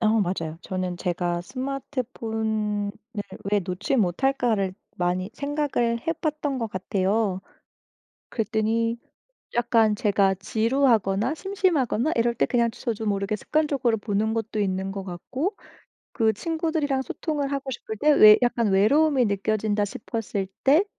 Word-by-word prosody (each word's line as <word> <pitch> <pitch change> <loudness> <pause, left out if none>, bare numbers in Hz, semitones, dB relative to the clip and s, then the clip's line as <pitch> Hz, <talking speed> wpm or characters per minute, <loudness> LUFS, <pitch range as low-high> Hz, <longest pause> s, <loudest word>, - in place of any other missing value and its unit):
어 220 - +2
맞아요. 165 -4 -2
저는 185 -1 -3
제가 175 -1 -1
'스마트폰을 220 -4 -3 0.6
왜 205 - +4
놓지 190 +8 -2
못할까?'를 220 0 +1 0.2
많이 180 +2 -1
생각을 280 -5 0
해 330 - +2
봤던 300 -4 -2
것 230 -2 -2
같아요. 190 +1 0 0.9
그랬더니 225 +1 0 0.6
약간 230 -3 +3
제가 200 -2 +2
지루하거나 220 - +1
심심하거나 330 - 0
이럴 235 0 +2
때 - - +1
그냥 235 -2 +2
저도 225 -1 -4
모르게 200 +1 0
습관적으로 280 -6 +1
보는 210 +1 0
것도 220 -1 -3
있는 190 -1 -1
것 195 -1 -5
같고 255 - -3 0.6
그 225 -3 +2
친구들이랑 320 -1 -1
소통을 290 -1 -3
하고 275 -1 -3
싶을 220 -3 -6
때 300 +7 +4
외 215 -6 +9
약간 235 -2 +1
외로움이 260 +7 +4
느껴진다 205 +1 0
싶었을 205 -2 -4 0.2
때 300 +9 +5
225 Hz, 295 characters per minute, -25 LUFS, 200-270 Hz, 0.9 s, 외